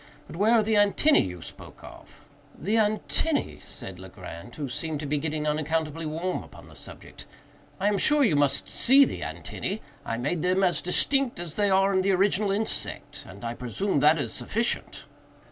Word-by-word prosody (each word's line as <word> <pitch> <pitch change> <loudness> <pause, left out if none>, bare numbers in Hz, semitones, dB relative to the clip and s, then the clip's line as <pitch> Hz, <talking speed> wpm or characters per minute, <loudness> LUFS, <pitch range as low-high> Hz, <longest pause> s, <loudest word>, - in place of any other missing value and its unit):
But - - -11
where 210 +6 +3
are 225 -2 +5
the 220 +1 0
antennæ 205 +9 +4
you 90 -2 -8
spoke - - -11
of?" - - -14 0.3
"The 200 +7 -2
antennæ!" 220 +8 0
said 95 -1 -9
Legrand, 90 +2 -10
who 145 -2 -4
seemed 155 +4 -3
to - - -5
be 145 +1 0
getting 155 0 -2
unaccountably 155 +1 -1
warm 170 +4 -2
upon - - -14
the - - -15
subject; - - -11 0.5
"I 195 - +1
am 205 -1 +1
sure 295 -1 +4
you 210 - +3
must 145 -1 +2
see 275 +3 +5
the - - -5
antennæ. 205 - -5 0.2
I 115 - -3
made 145 +7 -2
them 185 +3 +2
as 175 -6 +2
distinct 265 +6 +1
as 170 -3 -4
they 205 +1 +1
are 195 +1 +3
in 190 - +3
the 195 +1 +2
original 195 +2 +2
insect, 215 +3 -3
and 100 +4 -10
I 115 - -2
presume 140 - -2
that 150 +3 +5
is 145 - -2
sufficient." 230 +2 -2
175 Hz, 185 wpm, -26 LUFS, 145-205 Hz, 0.5 s, are